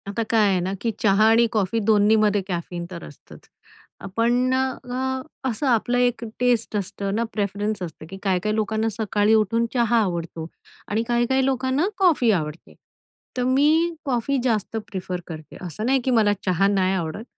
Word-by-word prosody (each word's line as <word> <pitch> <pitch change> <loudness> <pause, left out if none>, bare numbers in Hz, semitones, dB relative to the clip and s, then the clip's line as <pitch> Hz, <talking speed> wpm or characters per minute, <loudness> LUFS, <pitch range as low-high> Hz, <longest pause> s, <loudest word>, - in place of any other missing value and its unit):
आता 205 +3 -2
काय 220 -2 +4
आहे 190 -2 +2
ना, 185 +2 -2
की 230 - 0
चहा 205 0 +4
आणि 230 +1 +5
कॉफी 215 0 0
2न्हीमध्ये 210 -1 +4
कॅफीन 175 -1 -4
तर 170 -2 -7
असतच, 145 - -15 0.6
अ, - - -10
पण 245 +2 +2
अ, 260 0 -2 0.3
असं 245 +4 -2
आपलं 240 0 +2
एक 245 -1 +1 0.2
टेस्ट 240 -3 +1
असतं 200 0 -3
ना, 230 - +1
प्रेफरन्स 205 0 -2
असतं 160 -2 -8
की 195 - -8
काही-काही 195 +2 0
लोकांना 220 +1 0
सकाळी 210 -1 +2
उठून 220 +2 +2
चहा 235 -2 +2
आवडतो 170 -3 -4 0.4
आणि 220 +2 0
काही-काही 240 +2 +2
लोकांना 265 +5 +1
कॉफी 330 - +4
आवडते. 155 -4 -3 0.6
तर 250 - +1
मी 305 +6 +3
कॉफी 265 +1 0
जास्त 225 -3 -1
प्रेफर 185 -2 -4
करते. 155 -2 -9
असं 195 +6 -5
नाही 265 +2 +3
की 260 - +2
मला 215 -4 +4
चहा 185 +1 +2
नाही 190 -2 +2
आवडत, 170 +3 -4
220 Hz, 165 wpm, -23 LUFS, 195-245 Hz, 0.6 s, आणि